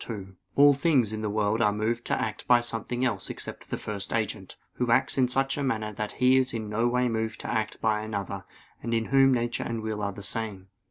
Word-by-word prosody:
2: 95 -4 -7 0.2
All 145 0 +7
things 135 -7 +2
in 110 - -3
the 105 - -1
world 105 +1 +1
are 105 -3 +4
moved 110 +3 -1
to - - 0
act 110 - -4
by 120 -1 +6
something 120 +1 -2
else 105 -6 -1
except - - -6
the - - -2
First 100 -2 -5
Agent, 110 -4 -2 0.2
Who 125 -1 0
acts 115 - +3
in 130 -2 +3
such 135 +3 0
a - - -1
manner 110 -5 -1
that 105 +1 -4
He 130 +1 +4
is 130 -2 +1
in 110 -2 -4
no 115 +3 +1
way 125 +1 +2
moved 110 -1 -2
to - - -6
act 110 -2 -2
by 110 -1 +2
another; 100 -2 -4 0.4
and 115 -1 -1
in 115 0 0
Whom 135 0 +6
nature 120 -2 0
and 115 -1 -3
will 110 -1 -3
are 100 0 -1
the 100 +1 -9
same. 100 -3 -2
110 Hz, 235 wpm, -27 LUFS, 105-125 Hz, 0.4 s, All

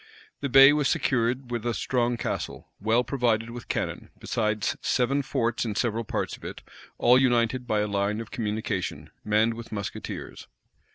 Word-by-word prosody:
The 140 - -2
bay 135 +2 +9
was 150 -2 +2
secured 125 +1 0
with 120 -2 -2
a 120 -1 -1
strong 120 +3 0
castle, - - -4
well 110 +4 +2
provided 115 -3 0
with 120 0 -8
cannon, - - -3
besides 110 -2 -1
seven 135 +3 +1
forts 120 -4 -1
in 110 -3 -3
several 115 0 0
parts - - -2
of - - -19
it, - - -7 0.3
all 125 +2 +5
united 125 -1 +2
by 105 -1 +1
a 105 - 0
line 100 +1 0
of 115 0 -7
communication, 105 -3 -3
manned 110 +2 +2
with 115 0 -9
musketeers. 100 -2 -6
115 Hz, 165 wpm, -26 LUFS, 110-125 Hz, 0.3 s, bay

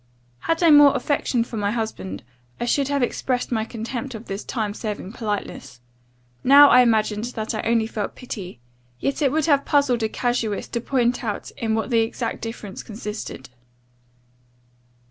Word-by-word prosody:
Had 330 - -1
I 335 - +6
had - - +8
more 290 -1 +8
affection 260 -2 0
for 230 -1 -7
my 205 -1 0
husband, 205 - -4 0.4
I - - -1
should 275 +2 +1
have 280 -2 0
expressed 250 +1 -1
my 220 -2 0
contempt 235 +2 -5
of 220 +2 -8
this 195 +1 -5
time 215 -4 -3
serving 210 -3 -5
politeness: 210 - -5 0.6
now 285 +2 +8
I 250 - +8
imagined 220 -2 +2
that 225 -3 -4
I 215 - -2
only 230 -1 +2
felt 215 -2 -4
pity; 190 - -7 0.4
yet 275 - -2
it 275 -3 +3
would 310 0 +1
have 285 -3 +3
puzzled 280 -5 +2
a 220 - 0
casuist 235 -4 -2
to 235 - -1
point 250 0 0
out 210 -3 -4
in 225 -4 -2
what 225 +3 -2
the 230 - +4
exact 230 +1 -3
difference 225 -3 -6
consisted. 210 - -7
230 Hz, 170 wpm, -23 LUFS, 215-260 Hz, 0.6 s, had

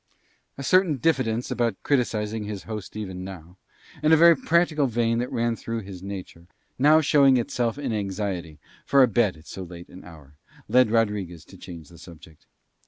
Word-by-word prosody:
A 140 - -6
certain 180 0 +3
diffidence 125 -5 0
about 115 -4 0
criticising 110 -5 -1
his 105 -2 -6
host 105 -3 -7
even 95 -4 -6
now; 90 -1 -10 0.4
and 155 +1 +2
a 160 - +7
very 170 +1 +7
practical 160 -1 +1
vein 115 -1 0
that 125 - -3
ran 115 0 0
through 115 0 -5
his 95 -3 -10
nature, 95 -3 -9 0.3
now 150 +4 +5
showing 140 -3 +4
itself 120 0 -2
in 135 -5 -3
anxiety 95 -6 -4 0.3
for 140 -1 +4
a - - +5
bed 110 -5 +1
at 80 - -18
so 95 - -8
late 85 -1 -10
an 95 - -13
hour, 75 -5 -15 0.3
led 125 -2 +4
Rodriguez 105 -7 -1
to - - -16
change 85 -4 -11
the 85 -2 -16
subject. 80 -2 -15
110 Hz, 175 wpm, -24 LUFS, 90-130 Hz, 0.4 s, a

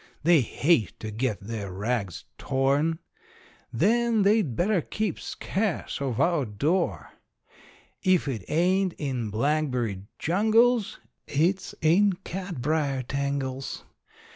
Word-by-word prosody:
They 165 -2 +5
hate 125 +1 +1
to 110 - -5
get 110 0 -2
their 100 -2 -5
rags 100 -1 -3
torn. 140 +5 +1 0.7
Then 235 -1 +2
they'd 200 - +2
better 190 - +2
keep 215 +2 -3
scarce 195 -6 -3
of 130 -4 -2
our 165 0 +2
door. 145 - -1 0.9
If 185 -5 +2
it 115 -8 -3
ain't 185 +3 +2
in 130 -8 -3
blackberry 125 -4 0 0.2
jungles 220 +5 +2 0.3
it's 175 +7 0
in 190 +6 +4
catbrier 155 -6 -2
tangles. 140 -1 -3
150 Hz, 105 wpm, -26 LUFS, 125-185 Hz, 0.9 s, They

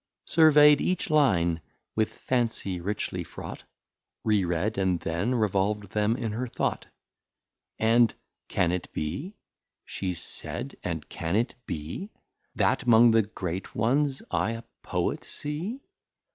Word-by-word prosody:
Survey'd 150 -2 +6
each 180 -2 0
Line 85 - +3 0.3
with 110 -1 +1
Fancy 115 -7 -1
richly 100 +4 -2
fraught, - - -9 0.6
Re 105 -3 +3
read, 90 +5 0
and 95 -2 +1
then 85 +9 -1
revolv'd 105 -2 0
them 105 +2 +1
in 115 -4 -2
her 120 +4 -3
Thought. - - -2 0.9
And 115 +1 +4 0.4
can 85 -1 +1
it 90 -1 -3
be? 140 - -4 0.5
She 90 -2 -3
said, - - -4
and - - -3
can 85 +3 -3
it 115 +3 +1
be? 80 - -5 0.5
That 125 - +1
'mong 115 0 +7
the 115 0 +5
Great 95 -3 -5
Ones 135 +5 +1
I 85 +6 +1
a 115 0 -7 0.2
Poet - - -1
see? 170 - -5
110 Hz, 130 wpm, -27 LUFS, 90-130 Hz, 0.9 s, mong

